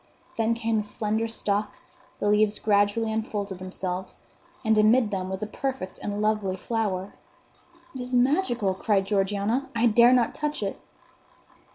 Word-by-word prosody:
Then 225 0 +1
came 225 -1 0
the - - -2
slender 215 +2 -2
stalk; 210 -2 -2 0.4
the 205 - -1
leaves 210 0 +3
gradually 210 +1 +2
unfolded 205 -3 -3
themselves; 185 0 -5 0.4
and 220 0 +4
amid 215 +1 +4
them 185 -2 -2
was 190 +2 -4
a - - 0
perfect 215 -3 -4
and 205 0 -3
lovely 210 -3 0
flower. 200 -3 -2 0.8
"It 260 - -6
is 250 0 -6
magical!" 245 - +2
cried 195 0 +1
Georgiana. 205 +5 0
"I 230 +1 +2
dare 235 +2 +6
not 245 -2 +3
touch 300 0 -3
it." - - -4
215 Hz, 150 wpm, -26 LUFS, 200-230 Hz, 0.8 s, dare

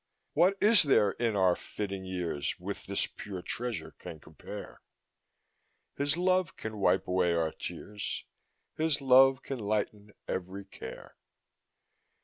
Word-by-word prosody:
What 180 +6 +4
is 215 +1 +7
there 105 -8 +4
in 115 -1 -1
our 95 -3 +4
flitting 100 -2 -5
years 90 -6 -3
With - - -6
this - - +1
pure 95 -3 -8
treasure 120 -1 -3
can 80 - -8
compare? 75 +1 -10 1.1
His 145 +3 0
love 185 0 +1
can 110 -1 -6
wipe 95 -1 +2
away 90 -1 +2
our 80 -1 +1
tears, 105 +5 -5 0.5
His 155 -2 +1
love 135 0 +6
can 135 -2 -4
lighten 105 0 -2
every 95 +2 -4
care. 95 - -10
105 Hz, 125 wpm, -30 LUFS, 95-135 Hz, 1.1 s, is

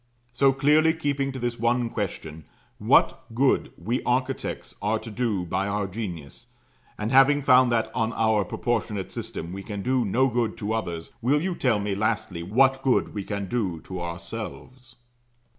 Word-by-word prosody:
So 135 +2 +4
clearly 150 +4 +3
keeping 140 -3 -1
to 135 - -7
this 120 -1 -3
one 120 0 +1
question, 80 -7 -5 0.3
what - - +3
good 130 +2 +2
we 115 +9 -2
architects 125 +1 -2
are 105 +2 +1
to 115 - -8
do 105 -5 -1
by 95 +3 -1
our 100 0 -1
genius; 95 -1 -7 0.5
and 105 +2 -3
having 135 +2 +5
found 130 -2 +5
that 115 -1 +1
on 115 0 0
our 110 -2 +2
proportionate 105 -1 -2
system 110 -7 -5
we 100 - -5
can 100 0 -6
do 130 -1 +1
no 120 +6 +2
good 120 -2 -1
to 110 -1 -2
others, 85 -7 -4
will 135 +5 +3
you 190 0 -1
tell 125 -9 +1
me, 100 0 -2
lastly, 95 -4 -1
what 130 +9 +3
good 135 -2 +1
we 100 - -3
can 100 0 -4
do 95 -7 -2
to 90 -2 -7
ourselves? 115 +8 -7
115 Hz, 170 wpm, -25 LUFS, 100-130 Hz, 0.5 s, having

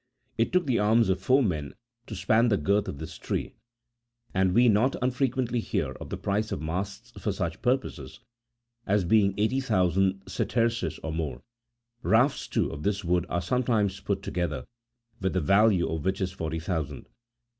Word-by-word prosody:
It 115 - +1
took 180 -2 +2
the 125 -5 +1
arms 110 +1 +3
of 95 - 0
four 130 +2 +4
men 75 - -2 0.3
to 110 - -6
span 110 +5 +3
the 105 -3 +3
girth 100 +7 +1
of - - -5
this - - -8
tree, - - -3 0.8
and 95 -1 +2
we 120 +1 +6
not 115 +5 +3
unfrequently 125 -1 0
hear - - -2
of - - -9
the - - -4
price 105 +2 -1
of - - -2
masts 100 +9 -4
for 105 - 0
such 90 -3 -3
purposes, 125 - -2 0.7
as 100 -2 +2
being 100 0 +3
eighty 110 +6 +1
thousand 95 -5 +1
sesterces 115 -1 0
or 80 - -3
more: 70 -6 -4 0.6
rafts, 115 - +2
too, - - 0
of 75 - -7
this 100 +3 -1
wood 90 0 +1
are 85 - 0
sometimes 105 -2 +1
put 100 -1 -2
together, 80 -10 -2 0.5
the 95 -1 0
value 100 +2 +4
of 80 -2 -3
which 95 +3 0
is 95 -2 -1
forty 80 -3 -4
thousand. 80 -4 -3
100 Hz, 170 wpm, -27 LUFS, 85-115 Hz, 0.8 s, we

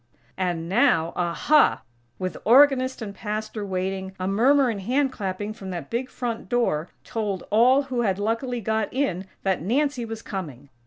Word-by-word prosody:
And, 175 -3 -2
now 165 -2 +3
aha!! 180 - +3 0.3
With 185 0 -3
organist 260 0 +5
and 200 -2 -6
Pastor 215 +1 -4
waiting, 190 0 -3
a 185 - -2
murmur 260 +7 +4
and 210 -4 -3
hand 265 +6 +1
clapping 205 -1 -4
from 195 -3 -9
that 170 -6 -6
big 250 +3 -2
front 235 -3 -4
door 210 -10 0
told 210 -6 -3
all 250 +6 +5
who 255 -3 -2
had 195 -5 +1
luckily 230 +4 -1
got 220 0 -1
in 195 -9 -1 0.2
that 190 -4 0
Nancy 260 - 0
was 225 -1 -6
coming! 145 - -6
215 Hz, 160 wpm, -24 LUFS, 190-245 Hz, 0.3 s, organist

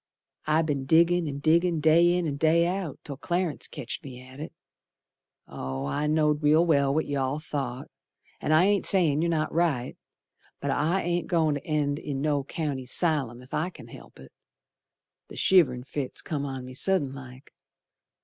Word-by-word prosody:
I 155 +1 +3
be'n 140 -4 -2
diggin' 170 +3 +3
and 140 -1 -4
diggin' 170 +1 +3
day 170 +3 +4
in 180 - -1
and 140 -2 -3
day 165 +2 +4
out 180 -4 -3
Till 140 -2 -7
Clarence 175 0 -2
ketched 145 +2 -6
me 130 -4 -9
at 130 +2 -13
it. 155 +3 -6 1.0
Oh, 65 +1 -5
I 110 - -1
know'd 150 -1 +2
real 155 +3 +4
well 140 -4 +3
what 155 +3 0
you 145 -1 -2
all 135 +3 -1
thought, 135 -5 -5 0.5
An' - - -1
I 155 +3 +5
ain't 205 0 +2
sayin' 160 -6 +2
you're 170 - +1
not 155 -2 -1
right, 155 -7 0 0.6
But 140 - -2
I 165 +7 +1
ain't 175 0 -1
goin' 160 -4 +2
to 145 - -6
end 150 -2 0
in 140 -2 -4
no 145 -1 0
county 140 -3 -4
'sylum 130 -6 -1
If 125 - -16
I 160 +4 0
c'n - - -13
help - - -14
it. 65 0 -14 1.0
The - - -11
shiv'rin' 135 -10 +3
fits 135 0 -4
come 145 -4 -3
on 135 -2 -6
me 130 - -9
sudden 145 -2 +1
like. 130 -1 -12
150 Hz, 180 wpm, -27 LUFS, 135-165 Hz, 1.0 s, I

